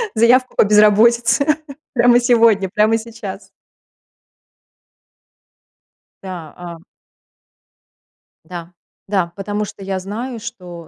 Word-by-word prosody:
заявку 250 +3 +3
по - - +5
безработице 230 +5 +4 0.5
прямо 240 -1 +4
сегодня, 230 -5 +3
прямо 215 +4 +2
сейчас". 220 -4 -9 2.8
Да, 175 -5 -8
а 175 -1 -9 1.7
Да, 175 -1 -9 0.3
да, 190 -4 -1
потому 205 +1 -3
что 195 - -11
я 190 -1 -3
знаю, 225 +6 -6
что 180 -8 -10
210 Hz, 90 wpm, -18 LUFS, 190-235 Hz, 2.8 s, по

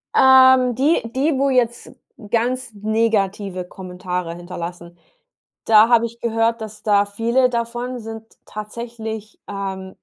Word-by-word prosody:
Ähm, 260 -2 +6
die 285 +7 +2
die, 280 +2 +1
wo 275 0 +2
jetzt 240 -2 0 0.4
ganz 245 +2 -1
negative 205 -3 -1
Kommentare 180 -2 -5
hinterlassen, 175 0 -8 0.7
da 220 0 +6
habe 235 -1 +4
ich 235 +1 -15
gehört, 230 0 0
dass 215 -1 -8
da 205 -2 +3
viele 235 +5 +1
davon 240 +1 -3
sind 225 0 -8 0.2
tatsächlich, 220 0 -7
ähm, 190 -1 -6
225 Hz, 120 wpm, -20 LUFS, 200-240 Hz, 0.7 s, Ähm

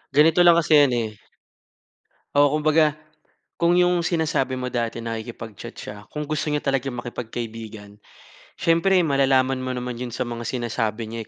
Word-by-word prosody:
ganito 160 +4 +5
lang 175 -1 +7
kasi 165 -1 0 0.2
yan 125 - -2
eh 115 -2 -1 1.3
Oo, 145 -1 +5
kumbaga 155 0 +3 0.6
kung 170 +1 +3
yung 180 -1 +3
sinasabi 160 -6 0
mo 125 -1 -4
dati, 115 -1 -2
nakikipag-chat 115 -2 -7
siya, 105 - -8
kung 150 - -4
gusto 150 0 -3
niya 150 -1 -1
talagang 135 -2 -1
makipagkaibigan, 115 -3 -7 0.6
siyempre 170 +3 +3
malalaman 135 -2 +2
mo 130 0 -3
naman 125 -1 -5
yun 125 - -4
sa - - -1
mga 120 -1 -5
sinasabi 115 -2 -2
niya. 115 -1 -6
130 Hz, 150 wpm, -23 LUFS, 115-155 Hz, 1.3 s, lang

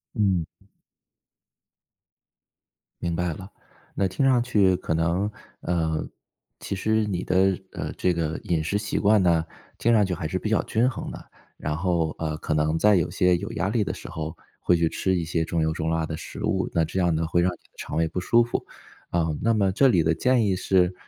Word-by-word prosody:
嗯。 95 -6 +2 2.6
明 85 -1 -1
白 90 -1 -1
了， 95 +4 -10 0.4
那 95 - +1
听 95 +9 0
上 130 -2 +4
去 100 -6 +3
可 80 - -2
能， 85 +5 +1 0.3
呃， 80 -3 -1 0.5
其 100 - -4
实 110 +3 +1
你 95 -4 -2
的 95 0 +2 0.2
呃， - - -4
这 90 - +1
个 80 -1 -2
饮 80 -3 0
食 100 +6 0
习 105 0 -3
惯 105 0 +4
呢， 85 -2 +3 0.3
听 120 - +2
上 105 -3 +5
去 95 - -2
还 80 - -3
是 95 +3 -2
比 110 - -3
较 110 - +2
均 120 +4 +1
衡 120 - -6
的， - - -11 0.3
然 75 0 -3
后， 85 -3 0
呃， 80 -1 -2
可 75 - -2
能 75 +1 +1
在 105 +2 +5
有 85 - +1
些 90 -1 +3
有 100 +6 -6
压 100 -2 -1
力 110 -1 +1
的 - - -3
时 - - -9
候， 80 0 -5 0.2
会 90 - +3
去 85 - +2
吃 95 -1 0
一 85 - -1
些 80 0 0
重 80 0 -1
油 80 0 +1
重 80 0 -2
辣 80 0 0
的 80 0 -5
食 - - -8
物， - - 0
那 80 -1 +2
这 95 - -3
样 85 -2 +2
呢 80 0 0
会 85 +1 +2
让 90 +1 +2
你 90 - -10
的 - - -32
肠 - - -5
胃 80 0 +2
不 90 - -4
舒 120 +6 +4
服。 120 - -3 0.4
啊， 85 -1 +1
那 115 +1 +3
么 100 -3 +2
这 135 +8 +4
里 90 -10 +3
的 80 +1 +2
建 125 +5 +2
议 95 - +1
是， 90 0 +2
90 Hz, 230 characters per minute, -25 LUFS, 80-100 Hz, 2.6 s, 上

